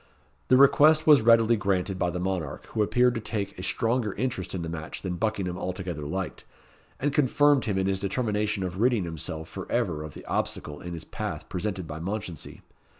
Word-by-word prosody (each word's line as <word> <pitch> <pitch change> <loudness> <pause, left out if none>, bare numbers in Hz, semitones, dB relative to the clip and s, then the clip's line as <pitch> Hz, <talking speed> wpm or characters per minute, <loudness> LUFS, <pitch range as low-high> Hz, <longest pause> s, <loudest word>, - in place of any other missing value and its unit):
The 130 - +6
request 155 +3 +6
was 150 -5 +7
readily 115 0 +5
granted 95 -2 -1
by 90 - +1
the 90 - -3
monarch, 90 -5 -3
who 110 - -1
appeared 125 +4 +3
to 115 - -3
take 105 -2 -3
a - - -4
stronger 115 +2 0
interest 120 -8 -3
in 90 - -3
the - - -4
match 80 0 -6
than 95 -2 -2
Buckingham 95 -4 -1
altogether 90 -5 -4
liked, 95 +4 -4 0.6
and 145 +1 0
confirmed 145 0 +4
him 100 -3 -1
in 95 - +1
his 95 -1 0
determination 105 -1 -1
of 90 0 -4
ridding 120 -3 +3
himself 80 -1 -5
for - - -8
ever 75 - 0
of 75 -2 -8
the - - -10
obstacle 75 -1 -3
in 85 0 -6
his 85 - -6
path - - -5
presented 95 -1 -3
by 75 0 -6
Mounchensey. 90 -1 -5
95 Hz, 195 wpm, -27 LUFS, 90-115 Hz, 0.6 s, was